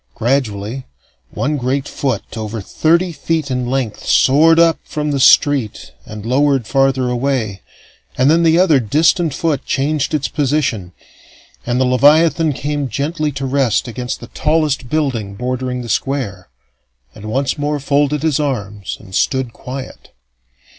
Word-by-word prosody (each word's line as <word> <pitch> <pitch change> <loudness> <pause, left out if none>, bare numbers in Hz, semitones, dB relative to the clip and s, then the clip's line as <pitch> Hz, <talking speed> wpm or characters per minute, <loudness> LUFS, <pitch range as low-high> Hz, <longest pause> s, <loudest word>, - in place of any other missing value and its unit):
Gradually, 120 -1 -2 0.4
one 150 +2 -2
great 135 +2 -1
foot, 130 -7 -3
over 110 0 -4
thirty 170 - +1
feet 160 -3 -2
in 125 -1 -1
length, 130 -5 -2
soared 160 +5 +4
up 165 -1 +4
from 150 -1 -3
the 140 - -1
street 135 -4 +3 0.2
and 105 0 -8
lowered 135 0 +2
farther 135 0 +1
away, 120 -6 -2 0.6
and 130 - +3
then 165 +3 +4
the 165 0 +4
other 175 -6 +4
distant 155 - +2
foot 150 0 -1
changed 145 +2 -1
its 145 - -1
position; 135 - -1 0.8
and 120 +1 0
the 130 - +3
leviathan 150 +5 +4
came 145 0 -3
gently 150 - -2
to 135 0 -4
rest 130 -5 +1
against 125 +1 -5
the - - -9
tallest 150 -5 0
building 120 -10 -2
bordering 125 +2 -3
the - - -8
Square, 115 -7 -3 0.6
and 105 - -11
once 135 +6 -1
more 145 0 -1
folded 145 +1 0
his 155 -3 +1
arms 105 -9 -3
and 95 -3 -15
stood 130 +3 0
quiet. 130 +1 -8
135 Hz, 145 wpm, -17 LUFS, 125-150 Hz, 0.8 s, soared